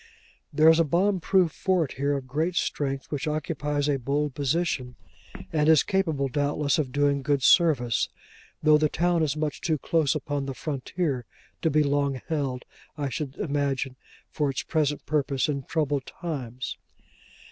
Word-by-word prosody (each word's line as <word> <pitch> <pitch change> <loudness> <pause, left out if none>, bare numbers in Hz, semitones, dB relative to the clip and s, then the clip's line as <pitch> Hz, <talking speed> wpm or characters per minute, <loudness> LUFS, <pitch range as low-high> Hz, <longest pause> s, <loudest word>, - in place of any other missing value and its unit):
There 155 +2 +4
is 160 0 +7
a - - +6
bomb 185 +6 +1
proof 180 -1 +3
fort 175 -6 0
here 140 +2 0
of 135 - -7
great 155 +7 -1
strength, 135 -4 -2
which 145 +1 -2
occupies 150 -1 -1
a 140 -2 +1
bold 140 +3 -1
position, 140 -3 -1 0.6
and 150 -1 +3
is 160 -3 +6
capable, 160 -8 0
doubtless, 145 +3 0
of 135 -4 -1
doing 145 0 +2
good 140 0 0
service; 135 - +4 0.5
though 155 0 +6
the 155 0 +2
town 175 +1 +1
is 155 -1 0
much 150 -1 -2
too 160 -2 +1
close 155 +1 +1
upon 145 -1 -3
the 135 - -4
frontier 140 -2 -3 0.4
to 160 - +2
be 155 0 +3
long 140 -2 0
held, 135 -5 -2 0.3
I 145 -2 -2
should 135 +1 -4
imagine, 140 -6 -1 0.4
for 150 -2 0
its 135 - -3
present 150 -2 -1
purpose 140 -3 0
in 140 -3 -3
troubled 145 -4 -1
times. 130 -7 -5
145 Hz, 160 wpm, -26 LUFS, 135-160 Hz, 0.6 s, is